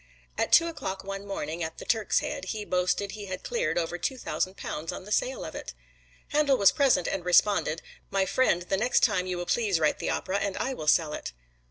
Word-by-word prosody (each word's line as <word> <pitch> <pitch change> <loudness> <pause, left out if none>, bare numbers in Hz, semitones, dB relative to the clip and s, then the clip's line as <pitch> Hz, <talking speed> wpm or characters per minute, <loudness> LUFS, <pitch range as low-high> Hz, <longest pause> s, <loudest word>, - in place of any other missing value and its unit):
At - - -1
two 335 - +7
o'clock 295 - -4
one 195 +1 -6
morning 165 -4 -4
at 160 0 -5
the - - -8
"Turk's 220 -3 +2
Head," - - -4
he 210 +2 -4
boasted 185 +2 0
he 205 -2 -7
had 185 -1 -5
cleared 480 - -1
over 175 +1 -1
two 260 +9 -2
thousand 190 -5 -2
pounds 155 +2 -4
on 185 - -8
the 210 - -10
sale - - 0
of - - -7
it. - - -7 0.5
Handel 290 -3 +3
was 200 -3 +6
present 265 - +3
and 195 -2 -2
responded, 180 -2 +3 0.3
"My 195 -1 +1
friend, 180 -4 +2
the 190 +2 -1
next 245 +5 +2
time 185 -2 +2
you 180 -1 -2
will 175 - -3
please 205 -4 +1
write 155 -1 +2
the - - -2
opera 195 +2 -1
and 200 -1 -2
I 265 - -1
will 155 -11 -7
sell 155 0 +4
it." - - -5
195 Hz, 225 wpm, -28 LUFS, 175-230 Hz, 0.5 s, two